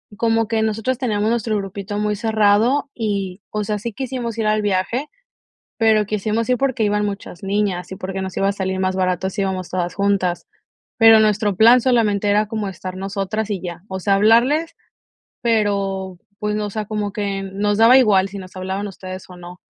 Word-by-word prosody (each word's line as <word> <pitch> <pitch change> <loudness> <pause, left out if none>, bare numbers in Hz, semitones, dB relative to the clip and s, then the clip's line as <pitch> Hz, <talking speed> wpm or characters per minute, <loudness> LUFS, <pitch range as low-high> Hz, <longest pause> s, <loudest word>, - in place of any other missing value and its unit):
como 225 0 +1
que 225 0 0
nosotras 225 +4 -1
teníamos 215 -3 0
nuestro 225 -2 0
grupito 200 +1 -5
muy 210 0 0
cerrado 220 +6 +2
y, 200 -4 -3
o 210 0 -2
sea, 210 0 -2
sí 230 +1 -5
quisimos 250 -3 -4
ir 225 - -1
al 215 0 +2
viaje, 205 +8 -1 0.7
pero 220 -2 +4
quisimos 215 +3 -2
ir 250 - +3
porque 260 -3 0
iban 210 0 +1
muchas 200 -3 -7
niñas 195 -3 -1
y - - -6
porque 190 0 -4
nos 190 -1 -6
iba 195 - +2
a - - +1
salir 190 -1 -3
más 185 0 0
barato 185 0 0
si 200 +1 -2
íbamos 185 -2 -3
todas 180 -1 -2
juntas. 195 -3 0 0.5
Pero 225 -1 +8
nuestro 210 -2 +2
plan 235 +4 +6
solamente 215 -5 +2
era 210 +1 +2
como 215 -2 -3
estar 185 0 -7
nosotras 200 +2 -3
y 195 -4 -2
ya". 175 -1 -6
O 190 0 -5
sea, 200 +2 +1
hablarles, 250 +11 +3 0.7
pero, 200 -4 0 0.2
pues, 210 0 -1
no, 210 - -1
o - - -4
sea, 215 0 -3
como 205 -1 -3
que 200 -2 -3
nos 205 +2 -1
daba 230 +4 +7
igual 195 -5 +3
si 200 - -7
nos 185 0 -11
hablaban 190 +2 -3
ustedes 185 -1 -8
o 180 - -11
no. 175 0 -11
205 Hz, 195 wpm, -20 LUFS, 190-220 Hz, 0.7 s, Pero